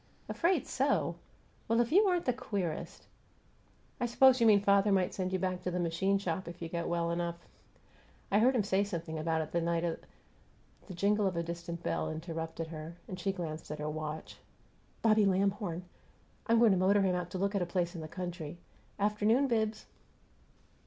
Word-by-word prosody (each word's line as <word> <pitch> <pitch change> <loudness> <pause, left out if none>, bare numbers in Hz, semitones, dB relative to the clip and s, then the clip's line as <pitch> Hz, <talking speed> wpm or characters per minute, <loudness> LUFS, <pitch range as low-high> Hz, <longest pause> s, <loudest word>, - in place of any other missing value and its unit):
"'Afraid 355 +2 +1
so'! - - +1 0.5
Well, 230 +1 +2
if 240 0 +1
you 400 +6 +6
aren't 355 -2 +1
the 250 - +2
queerest! 200 -10 -4 0.9
I 240 - 0
suppose 255 +1 +5
you 230 - +6
mean 210 -2 +7
father 200 0 +3
might 190 -2 +2
send 185 -1 -2
you 185 - +1
back 185 0 -2
to - - -2
the 180 0 -2
machine 175 +4 +1
shop 185 -2 -3
if 170 - -8
you 165 - -5
get 170 0 -3
well 170 -1 0
enough. 170 0 -3 0.8
I 205 - +4
heard 255 +4 +4
him 225 - +2
say 195 0 +2
something 170 -5 -4
about 160 0 0
it 155 - -10
the 170 - 0
night 170 0 0
of 170 -1 -2
the - - -22 0.4
" - - -30
The 190 - -7
jingle 205 +3 +2
of 180 -3 -2
a 170 - 0
distant 170 0 -6
bell - - -1
interrupted 165 0 -5
her, 160 +1 -7
and 185 - -6
she 195 +2 0
glanced 165 -4 -6
at 150 - -4
her 150 0 -3
watch. 155 0 -6 0.7
"Bobby 215 -2 +5
Lamhorn! 195 -2 0 0.6
I'm 230 0 +4
going 230 -2 +6
to 190 - +3
motor 195 +2 +4
him 185 -1 +2
out 180 -1 -2
to 185 - -5
look 200 +2 0
at 200 - 0
a 175 - -1
place 175 -1 -1
in 170 - -6
the 155 - -6
country. 175 -2 -6 0.4
Afternoon, 210 +6 +2
Bibbs!" 220 -3 -1
185 Hz, 200 wpm, -32 LUFS, 170-205 Hz, 0.9 s, mean